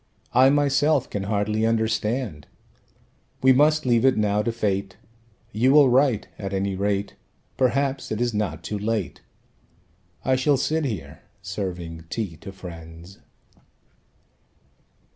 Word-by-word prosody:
I 130 +2 +6
myself 145 0 +2
can 100 -1 -3
hardly 105 +1 0
understand. 110 - -1 1.0
We 130 0 +7
must 150 +3 +3
leave 120 -2 +3
it 135 -1 +4
now 105 -1 +1
to 115 - -1
fate. 100 -4 -2 0.5
You 125 +5 +2
will 145 -3 +7
write, 125 -3 +2
at 100 -1 -5
any 95 0 -1
rate. 100 +1 -1 0.4
Perhaps 135 +1 0
it 110 - -2
is 120 -1 0
not 105 -7 -2
too 105 - -4
late. 105 -2 -2 1.0
I 130 - +3
shall 140 +2 +2
sit 155 +3 0
here, 110 - -5 0.2
serving 90 -4 -5
tea 105 -8 -4
to 100 +5 -9
friends." 85 -1 -11
110 Hz, 125 wpm, -24 LUFS, 100-130 Hz, 1.0 s, We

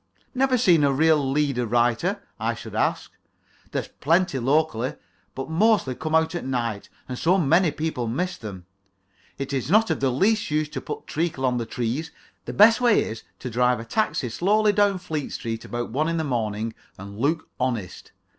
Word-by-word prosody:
"Never 260 -1 +2
seen 180 -10 +4
a 140 - +4
real 150 -1 +3
leader 135 -4 0
writer?" 120 0 +1 0.2
I - - -1
should - - -9
say. - - +2 0.7
"They're - - -2
plentiful 165 -5 +1
locally, 135 -4 +1 0.4
but 135 - -4
mostly 185 - +2
come 155 +5 -2
out 160 +1 +2
at 175 - -3
night, 120 -5 -3 0.2
and 125 -1 -5
so 180 +4 +3
many 170 +1 +3
people 150 -5 -3
miss 180 +11 -2
them. 95 -5 -9 0.7
It 135 0 -4
is 135 0 -2
not 220 +4 +4
of - - -1
the 135 - +2
least 205 - +1
use 150 0 0
to - - -5
put - - -6
treacle 155 -4 -2
on 125 -1 +1
the 115 -2 -3
trees. 125 +7 -2 0.4
The - - -4
best 225 +4 +6
way 240 -4 +4
is 110 0 -6 0.2
to 125 - -5
drive 125 +1 +2
a 115 - -7
taxi 135 - -1
slowly 205 - +2
down 205 -1 +3
Fleet 155 -5 -4
Street 115 -2 -4
about 120 -1 -4
one 155 +6 0
in 165 - -1
the 160 - 0
morning 115 -4 -2 0.2
and 100 +2 -9
look 160 +6 0
honest. 120 -8 -3
140 Hz, 185 wpm, -24 LUFS, 120-175 Hz, 0.7 s, best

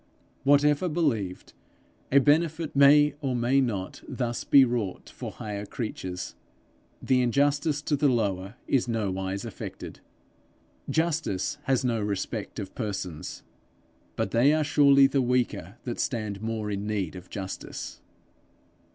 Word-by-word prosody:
Whatever 145 +4 +4
believed 115 - -1 0.6
a 140 - +5
benefit 155 +2 +2
may 145 +1 +6
or 135 -3 -1
may 125 +3 +3
not 100 -7 -3
thus 120 -2 -3
be 135 -2 +7
wrought 115 -6 -3
for - - -6
higher 105 -2 -5
creatures, 95 -5 -5 0.7
the 130 -1 +3
injustice 145 +4 +1
to 150 - +1
the 145 +1 +2
lower 100 -4 -1
is 130 -3 +2
nowise 100 -4 -2
affected. - - -8 0.9
Justice 160 - 0
has 130 -1 +1
no 115 -3 0
respect 105 +1 -3
of 100 -4 -6
persons, 95 -8 -5 0.7
but - - -2
they 130 +6 +4
are 155 0 +2
surely 140 -2 +6
the 135 0 +2
weaker 120 -6 -1
that 120 -2 -4
stand 105 -5 -2
more 110 -1 -3
in 100 +1 -3
need 100 -5 -2
of 90 0 -10
justice! 95 -2 -6
120 Hz, 130 wpm, -27 LUFS, 100-140 Hz, 0.9 s, be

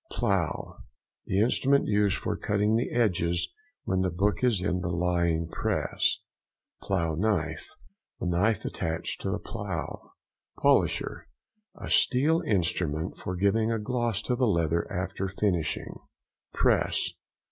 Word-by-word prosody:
PLOUGH.—The 95 - -3
instrument 135 +4 +3
used 105 -2 +2
for - - -2
cutting 105 +2 +1
the 120 +3 0
edges 85 -7 +1 0.3
when 95 -1 0
the 95 - +1
book 100 +7 0
is 120 -6 +3
in 90 -2 0
the 90 - -2
lying 85 -1 +1
press. - - 0 0.6
PLOUGH 85 -5 -1
KNIFE.—The 90 -4 -4
knife 95 +4 +1
attached 80 -2 -3
to - - -2
the 100 - 0
plough. 100 -6 -6 0.4
|178| - - -17
POLISHER.—A 215 -1 -1
steel 150 +6 +3
instrument 85 -4 0
for 90 - -4
giving 110 +4 +2
a 115 - +1
gloss 115 -1 -1
to 125 - 0
the 125 0 +2
leather 85 -3 +1
after 95 +1 -2
finishing. 90 -5 -1 0.5
PRESS. - - +1
95 Hz, 125 wpm, -28 LUFS, 85-110 Hz, 0.6 s, instrument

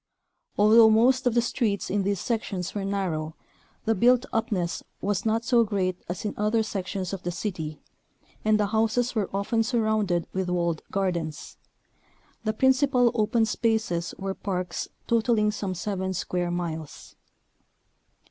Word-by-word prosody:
Although 220 +2 +7
most 250 +4 +4
of 240 - +1
the 235 - +4
streets 220 -5 -1
in 200 +1 +1
these 200 -1 0
sections 200 -6 -2
were 205 - -3
narrow, 175 -6 -2 0.5
the 225 - +3
built 245 +5 +4
upness 185 -7 -1 0.2
was 200 +1 -1
not 225 +1 +1
so 240 -2 +4
great 190 -4 -1
as 180 +4 -4
in 210 - -1
other 215 +2 +2
sections 195 -2 -4
of 195 - -4
the 175 - -3
city, 170 -4 -4 0.6
and 215 0 +3
the 210 - +3
houses 225 +3 +1
were 215 -4 -1
often 200 +4 0
surrounded 220 -7 +1
with 190 -1 -1
walled 170 -3 0
gardens. 170 -6 -3 0.9
The 215 -1 0
principal 260 0 +3
open 225 +1 +2
spaces 220 -7 -1
were 195 0 -3
parks 180 -3 -3 0.2
totaling 225 -2 +2
some 200 -3 -3
seven 190 0 -3
square 180 0 -2
miles. 165 -3 -5
205 Hz, 145 wpm, -26 LUFS, 180-225 Hz, 0.9 s, Although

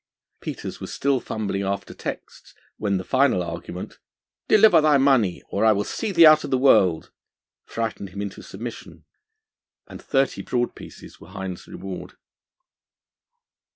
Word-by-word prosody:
Peters - - -6
was - - -7
still 140 -1 0
fumbling 105 -4 -3
after 100 0 -3
texts - - -8 0.2
when 100 -2 0
the 95 - -4
final 130 -6 +2
argument: 85 +1 -7 0.5
'Deliver 205 -6 +6
thy 150 -2 +4
money, 130 -9 +2
or 100 - -1
I 110 -1 +6
will 100 0 -1
send 210 - -4
thee 170 -1 +8
out 155 0 +7
of - - -5
the 130 - +2
world!' 95 - +3 0.6
frightened 110 -3 -4
him 100 +2 -9
into 100 -1 -5
submission, 115 +4 -9 0.8
and - - -11
thirty 135 -1 0
broad 120 -1 -1
pieces - - -13
were - - -13
Hind's 95 -2 -7
reward. 95 -1 -8
110 Hz, 145 wpm, -23 LUFS, 95-135 Hz, 0.8 s, thee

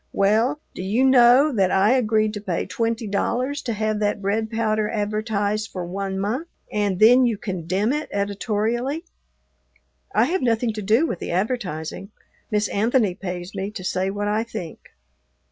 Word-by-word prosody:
"Well, 220 +9 +2
do - - -6
you 210 +7 +1
know 260 +3 +6
that 195 -5 +2
I 195 +4 +3
agreed 215 -4 +2
to 205 - -5
pay 180 -5 -2
twenty 230 0 -2
dollars 250 +7 -1
to 235 - -3
have 215 0 -1
that 210 0 0
bread 210 +3 -1
powder 215 -2 0
advertised 215 0 -1
for 180 -2 -5
one 190 +2 -4
month, 235 - -2 0.2
and 205 -3 0
then 245 +6 +7
you 225 -3 -1
condemn 190 - -1
it 300 +1 -3
editorially?" 220 - -1 1.1
"I 220 - +3
have 345 +6 -1
nothing 230 -2 +1
to 215 - -5
do 220 +10 +3
with 180 - -3
the - - -5
advertising; 185 -3 -3 0.4
Miss 210 -2 +1
Anthony 220 -1 +2
pays 180 -1 -6
me 195 0 -3
to 210 -3 -8
say 185 +1 -1
what 205 +1 -3
I 215 +2 +1
think." 215 -8 -8
215 Hz, 165 wpm, -23 LUFS, 195-235 Hz, 1.1 s, then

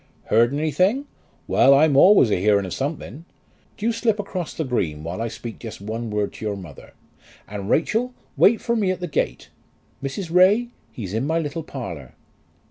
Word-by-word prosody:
"Heard 115 +3 +4
anything? 170 - +1 0.4
Well; 140 - +5
I'm 145 0 +4
always 160 - +6
a - - +2
hearing 100 0 +3
of 95 - -5
something. 145 - -5 0.5
Do 215 - -5
you 235 - +3
slip 230 -2 0
across 185 -4 -4
the 160 - -2
green 85 - -2
while 85 +6 -5
I 115 - -1
speak 115 0 -8
just 115 -2 -8
one 110 +3 -5
word 105 -1 -2
to - - -10
your 105 -1 -1
mother. 85 -7 -12 0.5
And 100 0 -6
Rachel, 240 +9 +1 0.2
wait 225 +2 +4
for 235 - 0
me 205 -4 +1
at 185 -1 -1
the 180 - -3
gate. 155 - -2 0.5
Mrs. 160 +6 -5
Ray, 200 +7 +5 0.2
he's 100 -5 -7
in 115 +6 -1
my 160 +2 +1
little 165 0 -3
parlour." 90 - -8
140 Hz, 185 wpm, -22 LUFS, -, 0.5 s, always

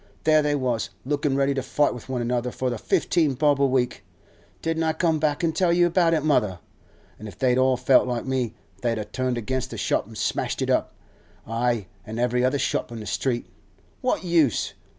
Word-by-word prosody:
There 155 -1 +5
they 145 0 +1
was, 125 -5 -1 0.2
lookin' 145 0 0
ready 140 0 +2
to 135 - -1
fight 145 +3 +1
with 125 +1 -10
one 125 -2 -1
another 120 +1 -1
for 130 +1 -2
the 120 - -4
fifteen 150 +2 +1
bob 145 +1 +2
a - - +5
week. 130 -2 0 0.6
Didn't 165 0 0
I 160 -1 +1
come 160 -1 +1
back 150 +1 0
and 160 -2 +1
tell 175 0 +2
you 175 +1 +4
about 170 -1 +3
it, 155 - -1
mother? 105 - +2 0.6
An' 110 - -8
if 100 - -11
they'd 130 -1 +2
all 130 -1 +3
felt 125 0 +4
like 120 -2 -2
me, 130 -4 -1 0.3
they'd 115 -2 0
a 105 - -3
turned 125 +3 -2
against 130 +3 -2
the 115 - -7
shop 100 - 0
an' 110 - -12
smashed - - -1
it - - 0
up—ay, 115 -2 -3 0.2
an' 110 +4 -7
every 125 +1 +1
other 130 +3 +2
shop 130 - -1
in 115 - -6
the 105 - -7
street! 120 +4 -1 0.6
What 250 - 0
use? 165 - +2
130 Hz, 210 wpm, -24 LUFS, 120-150 Hz, 0.6 s, There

